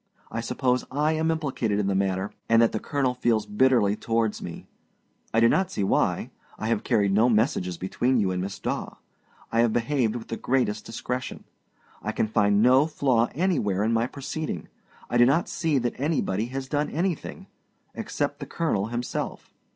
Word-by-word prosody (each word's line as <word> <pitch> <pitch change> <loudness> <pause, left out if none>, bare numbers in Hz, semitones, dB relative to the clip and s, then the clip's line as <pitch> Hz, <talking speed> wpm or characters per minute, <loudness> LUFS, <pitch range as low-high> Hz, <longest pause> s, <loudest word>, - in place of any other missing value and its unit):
I 115 - -2
suppose 125 +1 0
I 150 +3 +1
am 160 +1 0
implicated 135 -10 -1
in 105 - 0
the 100 - +1
matter, 95 0 0 0.2
and 115 0 +6
that 115 - +3
the 110 - -2
colonel 135 -2 0
feels 115 -4 +1
bitterly 105 -1 +3
towards 115 -1 -1
me. 85 - -7 0.7
I 115 - +3
do 115 - +6
not 190 +9 +2
see 100 - -2
why: 95 - +1 0.3
I 110 - -3
have 115 -3 0
carried 100 -2 +2
no 110 +5 +4
messages 105 - +1
between 125 +8 0
you 100 -4 +2
and 90 0 -2
Miss 95 +1 -4
Daw; - - -4 0.6
I 115 - +1
have 115 -1 +3
behaved 120 -2 +1
with 120 - -7
the 115 - -3
greatest 120 -5 0
discretion. 125 +3 -4 0.6
I - - -3
can - - 0
find 105 -1 +3
no 130 +4 +5
flaw 130 -7 +1
anywhere 135 - +1
in 115 +2 +1
my 115 +1 +2
proceeding. 140 - -5 0.4
I 120 - 0
do 120 - +8
not 145 +6 +2
see 160 -4 0
that 120 -1 -2
anybody 125 - 0
has 130 +1 -5
done 145 +2 0
anything 170 0 -3 0.5
except - - -3
the - - -6
colonel 110 -12 -1
himself. 120 +1 -4
115 Hz, 180 wpm, -26 LUFS, 105-135 Hz, 0.7 s, do